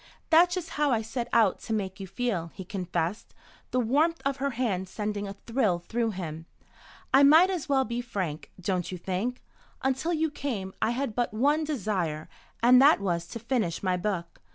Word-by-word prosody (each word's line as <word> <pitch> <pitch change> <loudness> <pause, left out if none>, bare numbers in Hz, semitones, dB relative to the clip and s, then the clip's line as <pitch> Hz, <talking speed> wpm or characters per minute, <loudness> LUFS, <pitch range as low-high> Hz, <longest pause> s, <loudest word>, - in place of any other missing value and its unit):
"That's 350 +2 +6
just 355 -3 -4
how 295 - +4
I 230 -4 +1
set 235 +2 -4
out 230 -2 +3
to 225 - -4
make 195 -2 -3
you 195 - -6
feel," 195 -7 -2
he 190 - -7
confessed, 180 0 -3 0.3
the 255 - 0
warmth 295 +8 +2
of 275 -1 0
her 280 0 0
hand 190 -7 -1
sending 205 0 -3
a 195 - -7
thrill 230 -7 +1
through 230 +6 -2
him. 165 -5 -6 0.7
"I 270 - +7
might 320 +7 +7
as 355 -7 -4
well 265 -1 +3
be 235 +2 -3
frank, 185 -10 -4
don't 185 -1 -2
you 185 - -4
think? 195 +8 -3 0.4
Until 265 +5 0
you 320 -2 0
came 210 -11 -4
I - - +2
had 240 -1 -2
but 240 -1 -1
one 290 +7 +2
desire, 190 - -2 0.4
and 250 +2 +7
that 285 -2 +6
was 170 -4 -1
to - - -6
finish 230 -8 -1
my 185 -1 +2
book. 180 - -3
225 Hz, 190 wpm, -28 LUFS, 185-265 Hz, 0.7 s, I